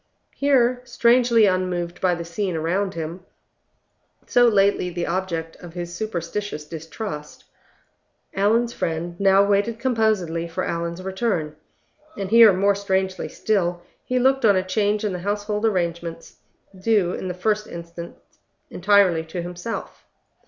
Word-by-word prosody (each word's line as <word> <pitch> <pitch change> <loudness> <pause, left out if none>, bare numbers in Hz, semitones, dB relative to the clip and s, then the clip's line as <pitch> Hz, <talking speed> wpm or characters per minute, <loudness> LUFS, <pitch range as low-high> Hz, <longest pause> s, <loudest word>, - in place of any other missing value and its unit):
Here, 255 -3 +2
strangely 235 -2 +4
unmoved 180 -2 -1
by 180 -2 +2
the 170 0 -6
scene 180 +1 -3
around 175 +4 -1
him, 165 +3 -5 1.0
so 245 0 +4
lately 200 -4 +3
the 175 0 -3
object 170 -3 -3
of 175 -1 -12
his 175 -1 -5
superstitious 175 -4 -4
distrust, 160 0 -7 0.9
Allan's 225 +5 +2
friend 170 +1 -3
now 195 0 +5
waited 205 +3 +1
composedly 215 -9 0
for 165 - -3
Allan's 170 +1 -3
return; 190 -6 -2 0.6
and 195 0 -4
here, 230 -2 +9
more 195 +2 +3
strangely 190 -1 -1
still, 175 -5 -1 0.2
he 255 - -1
looked 265 +1 +3
on 205 -3 +5
a 185 - +1
change 205 +2 0
in 205 - -1
the 180 - -4
household 210 +3 -1
arrangements, 170 -4 -3 0.4
due 190 -2 +1
in - - -4
the 180 - -4
first 215 +3 0
instance 170 0 -9 0.5
entirely 190 -3 +3
to 170 +2 -5
himself. 180 +6 -6
190 Hz, 135 wpm, -23 LUFS, 170-215 Hz, 1.0 s, here